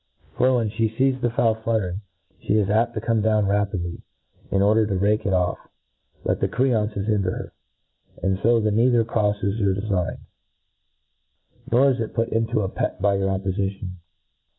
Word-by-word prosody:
For 130 +1 +3
when 115 -3 0
(he 110 +1 0
fees 130 +3 0
the 120 - +1
fowl 115 -1 +2
fluttering, 110 -4 -2 0.4
Ihe 105 - +1
is 105 -2 +1
apt 115 +2 +1
to 110 - -2
come 115 -1 +1
down 110 -1 +2
rapidly, 100 -4 -1 0.5
in 100 0 +2
order 110 +1 +3
to 100 - -1
rake 105 +2 +1
it - - +1
off, 90 -2 +1 0.6
but - - 0
the - - +1
creances 110 -6 0
hinder 105 -4 +1
her: - - -6 0.7
And 95 0 +1
fo 115 +2 +3
flie 110 -1 +1
neither 120 +1 +3
croiTes 105 -2 0
your 100 -3 +2
defign, 100 -3 -2 1.5
nor 135 +4 +5
is 130 - -1 0.2
put 115 -1 0
into 115 -1 0
a 95 - -1
pet - - -3
by 100 +1 +2
your 95 0 0
oppofition. 95 -1 -3
105 Hz, 170 wpm, -23 LUFS, 100-115 Hz, 1.5 s, nor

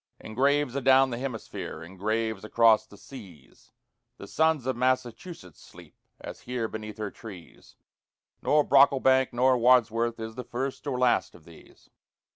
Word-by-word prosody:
In 110 - -10
graves 140 +2 +1
adown 135 0 +4
the 120 - -4
hemisphere, 105 -10 -6
in 85 +3 -13
graves 110 +1 -2
across 110 0 +3
the 100 - -16
seas, 95 - -15 0.5
The - - -10
sons 160 -5 0
of 130 -1 -1
Massachusetts 125 - -3
sleep, - - -16 0.3
as - - -9
here 120 -2 -3
beneath 110 -1 -8
her 105 -2 -5
trees, 95 -7 -13 0.7
Nor 150 0 +3
Brocklebank 130 -2 +4
nor 125 +1 +2
Wadsworth 115 -1 +2
is 110 0 -6
the 125 +2 -7
first 130 +4 -5
or 130 -3 -2
last 125 -1 +1
of 80 - -18
these. 85 -1 -19
120 Hz, 150 wpm, -27 LUFS, 110-130 Hz, 0.7 s, adown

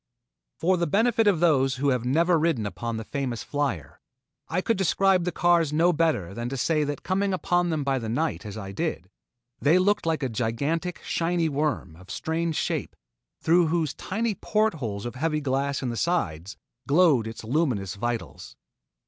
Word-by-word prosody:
For 185 +3 +2
the 170 0 0
benefit 225 +5 +2
of 195 -6 +4
those 135 -6 +3
who 140 +2 +1
have 125 -3 +1
never 165 +6 +3
ridden 155 -9 +1
upon 110 +4 -4
the 110 - -4
famous 125 -2 -3
"Flier," 140 - -3 0.5
I 170 - 0
could 225 +4 +1
describe 190 -1 +2
the 180 - 0
cars 170 -4 +3
no 170 +3 +3
better 155 - 0
than 120 +3 -4
to 135 - -4
say 150 +5 +1
that 145 -1 -4
coming 195 +1 0
upon 175 -1 +1
them 155 -3 -1
by 135 -1 0
night 125 +9 -2
as 105 -1 -7
I 100 -2 -6
did, 100 - -3 0.5
they 155 +5 +4
looked 190 -1 +2
like 160 -3 0
a - - +1
gigantic, 140 +10 -2
shiny 170 -1 0
worm, 145 - -2
of 95 +3 -16
strange 165 0 -2
shape, - - -2 0.5
through 170 +1 +4
whose 160 -3 0
tiny 220 +3 -2
port 215 +1 +1
holes 110 -9 -5
of 120 - -4
heavy 155 +4 -1
glass 140 0 -1
in 125 - -1
the 120 - -3
sides, 100 - -1 0.3
glowed 145 -7 +4
its 110 0 -7
luminous 115 - 0
vitals. 120 +2 -5
150 Hz, 180 wpm, -26 LUFS, 120-175 Hz, 0.5 s, of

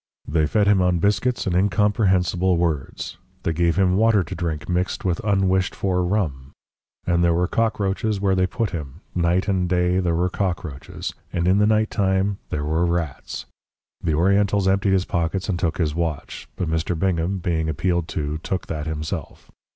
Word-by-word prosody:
They 75 +1 +2
fed 105 +5 +2
him 100 -2 +4
on 90 -1 +2
biscuits 105 +7 +1
and 90 -3 0
incomprehensible 95 -2 +2
words; 80 -6 -2 0.2
they 85 - 0
gave 85 0 +2
him 95 -1 +3
water 110 -2 +4
to 90 - -7
drink 80 -3 -3
mixed 90 +1 -1
with 90 -3 0
unwished 95 -3 +1
for 90 -2 0
rum. 80 -9 -2 0.5
And 85 0 +2
there 85 -1 +3
were 90 +1 +1
cockroaches 105 -1 0
where 95 -1 +2
they 95 0 +2
put 115 +2 -2
him, 80 -2 -6
night 90 +2 +1
and 95 -3 +1
day 90 0 +2
there 85 -3 +1
were 90 +2 +2
cockroaches, 90 -8 -4 0.2
and 85 0 0
in 95 +2 +4
the 105 - +4
night 110 0 +2
time 95 0 +1
there 75 -1 -2
were 80 +3 +1
rats. 85 -5 -3 0.6
The 80 -3 +1
Orientals 100 +3 +2
emptied 95 0 +2
his 95 -1 +2
pockets 85 +3 -1
and 90 -3 0
took 85 -3 0
his 80 -4 0
watch 80 -3 -3
but 90 - -2
Mr. 80 +2 -1
Bingham, 90 +1 0
being 80 -3 -1
appealed 85 +1 0
to, 75 0 -3
took 95 +3 -3
that 75 -1 -4
himself. 80 0 -5
90 Hz, 180 wpm, -23 LUFS, 85-95 Hz, 0.6 s, him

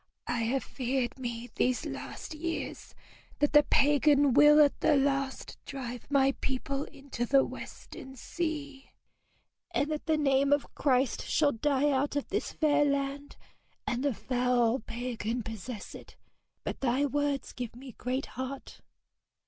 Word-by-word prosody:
'I 240 - -1
have 260 +3 0
feared 255 -1 -2
me 240 -1 -5
these 250 0 0
last - - -6
years 330 +2 -5 0.4
that 290 0 +1
the 295 - +9
pagan 290 -1 +4
will 295 +2 +7
at 290 -2 +5
the - - +4
last 275 -1 -1
drive 245 -3 -7
my 275 -1 +4
people 275 +1 -2
into 275 -3 -6
the 270 +3 +4
western 265 0 -9
sea, 290 -1 -5 0.8
and 290 +2 0
that 305 +1 -4
the 315 -1 +3
name 275 -1 +2
of 285 0 +1
Christ 260 -2 +1
shall 295 -2 +3
die 285 +4 +1
out 280 +2 0
of 285 - -2
this - - -2
fair 295 -2 +3
land, 280 0 -1 0.5
and 245 +1 -1
the 285 - +2
foul 250 0 +1
pagan 235 0 -4
possess 225 0 -7
it. - - -12 0.5
But - - -4
thy 265 +2 +2
words 285 0 -1
give 245 -2 -6
me 260 +1 -10
great 255 +4 -3
heart.' 260 +1 -7
275 Hz, 145 wpm, -30 LUFS, 250-285 Hz, 0.8 s, the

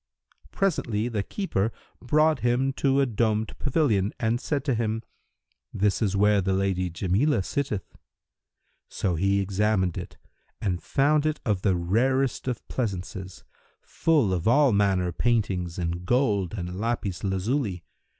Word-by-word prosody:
Presently, 120 - 0
the 110 -4 -1
keeper 110 - -2 0.3
brought 155 +3 +3
him 125 +3 +1
to 135 0 +2
a - - +3
domed 110 -2 0
pavilion 125 - +1
and 120 +2 0
said 145 -2 -2
to 135 - +1
him, 110 -1 -1 0.7
"This 100 +2 0
is 100 -3 +1
where 105 0 +4
the 95 +1 0
Lady 95 -1 0
Jamilah 95 - +1
sitteth." 110 -4 -3 0.9
So 95 - -1
he 100 +4 +1
examined 100 -2 0
it - - -9 0.4
and 90 -4 -1
found 150 +2 +2
it 155 0 -1
of 105 -6 0
the 95 -2 +2
rarest 125 +10 +1
of 125 -3 -3
pleasances, 95 -5 -4 0.4
full 145 -12 +1
of 85 0 -2
all 140 +3 +5
manner 95 -3 +2
paintings 95 -7 0
in 85 0 -3
gold 105 -4 +1
and 90 -1 -5
lapis 110 -5 -2
lazuli. 95 - -1
105 Hz, 140 wpm, -26 LUFS, 95-130 Hz, 0.9 s, all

